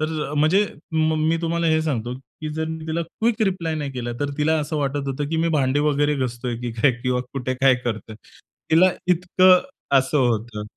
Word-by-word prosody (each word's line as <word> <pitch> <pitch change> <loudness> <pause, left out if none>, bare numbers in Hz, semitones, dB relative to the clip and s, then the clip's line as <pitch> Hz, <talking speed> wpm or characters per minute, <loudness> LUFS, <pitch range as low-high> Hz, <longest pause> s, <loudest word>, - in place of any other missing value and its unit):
तर 155 -2 -2
म्हणजे 160 +8 +3 0.3
म 160 0 +2
मी 165 - +2
तुम्हाला 170 0 0
हे 160 -1 +3
सांगतो, 125 -6 -2
की 135 +4 -9
जर 160 0 -1
मी 160 0 -6
तिला 160 +1 -1
क्विक 220 +7 -1
रिप्लाय 180 -5 -1
नाही 145 -3 -3
केला, 120 -1 -4
तर 145 - -1
तिला 155 +2 +2
असं 150 +1 -3
वाटत 140 -1 -1
होतं, 140 +2 -3
की 165 - -1
मी 165 +1 +1
भांडी 135 +1 +1
वगैरे 145 0 +1
घासतोय 120 -2 -3
की 120 -1 -4
काय 140 - +5
किंवा 125 -1 0
कुठे 130 -1 -2
काय 130 0 +4
करतोय. 110 -2 -4 0.5
तिला 180 +4 +6 0.2
इतकं 180 +1 +5 0.4
असं 135 +3 0
होतं. 115 -4 0
150 Hz, 195 wpm, -22 LUFS, 130-160 Hz, 0.5 s, तिला